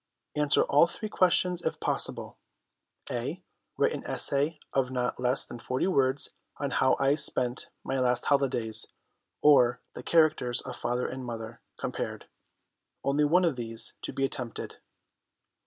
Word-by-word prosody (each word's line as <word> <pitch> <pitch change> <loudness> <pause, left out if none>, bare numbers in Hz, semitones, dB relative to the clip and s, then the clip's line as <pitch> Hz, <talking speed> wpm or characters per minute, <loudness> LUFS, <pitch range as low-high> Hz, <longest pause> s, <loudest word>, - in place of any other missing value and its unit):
Answer 150 -1 +3
all 145 +4 +4
three 215 +5 -6
questions 180 -2 +2
if 160 - -3
possible." - - -1 0.7
"(A) 140 +10 -4 0.3
Write - - +2
an - - -5
essay 145 +3 +1
of 135 -2 +1
not 125 -1 -2
less 125 +1 +3
than 120 - -9
40 130 +2 -2
words 135 -4 +3 0.3
on - - -3
How - - +3
I 135 +1 +3
spent 130 -4 +1
my 135 - -2
last 125 -1 +1
Holidays, 125 -6 +1 0.6
or 125 -5 +5
The - - -8
Characters 155 -7 +2
of - - -7
Father 120 +1 -2
and 130 0 -6
Mother 115 -1 -7 0.2
compared. - - -5 0.8
Only 145 +2 +2
one 175 +5 +3
of 165 -5 +1
these 115 -2 0
to - - -5
be 135 - -1
attempted." 125 -4 -6
135 Hz, 145 wpm, -28 LUFS, 125-150 Hz, 0.8 s, or